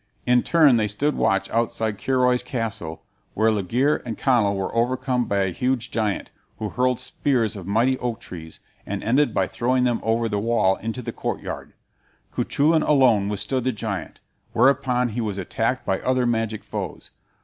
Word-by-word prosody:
In 125 0 +4
turn 155 -7 +5
they 110 -1 +1
stood 140 +9 0
watch 95 0 +1
outside 110 -2 -1
Curoi's 125 -1 +2
castle, 110 - -4 0.3
where 110 +2 +3
Laegire 115 +8 +1
and 115 -3 -5
Conall 115 -7 +2
were 95 -1 -3
overcome 125 +1 0
by 100 -1 +1
a 95 - 0
huge 125 +5 -1
giant, 110 -3 -1 0.3
who 110 - -3
hurled 125 +1 +1
spears 120 -6 0
of 95 -3 -8
mighty 120 +6 +2
oak 120 -2 -3
trees, 80 -3 -9 0.2
and 100 0 -5
ended 135 +6 +3
by - - +1
throwing 125 +1 0
them 120 -2 +1
over 115 +1 +1
the 105 -2 -1
wall 105 -3 +2
into 115 +3 -5
the - - -5
courtyard. - - -5 0.6
Cuchulain 155 +3 +2
alone 125 -10 +4
withstood 120 +5 -2
the 130 - +1
giant, 105 -6 -5 0.3
whereupon 125 -2 +3
he 115 +2 -3
was 105 -3 -3
attacked 115 +6 -1
by 95 - 0
other 130 -1 +1
magic 115 -2 -1
foes. - - -6
115 Hz, 170 wpm, -23 LUFS, 105-125 Hz, 0.6 s, turn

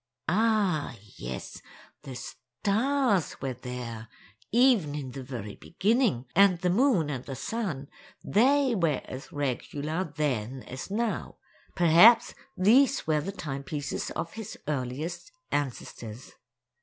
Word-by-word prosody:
Ah 200 - +2 0.2
yes, 60 +1 -6 0.4
the 135 -3 -8
stars 200 - 0
were 135 -1 -3
there, 120 -3 -7 0.4
even 230 - +4
in 135 -4 -5
the 135 +1 -7
very 120 -6 -6
beginning—and 195 - +2
the 180 - +2
moon 195 - +3
and 130 -3 -4
the 135 - -5
sun, 145 - -3 0.4
they 265 +5 +3
were 165 - +1
as 130 +2 -8
regular 145 +4 -2
then 135 - -2
as 130 +6 -7
now; 220 +2 -2 0.4
perhaps 175 +7 +7 0.2
these 255 +9 +4
were 155 -1 +2
the 190 +6 -4
timepieces 145 -3 -4
of 165 +1 -4
his 220 -1 -7
earliest 150 - -3 0.2
ancestors. 125 -4 -4
155 Hz, 115 wpm, -28 LUFS, 130-210 Hz, 0.4 s, perhaps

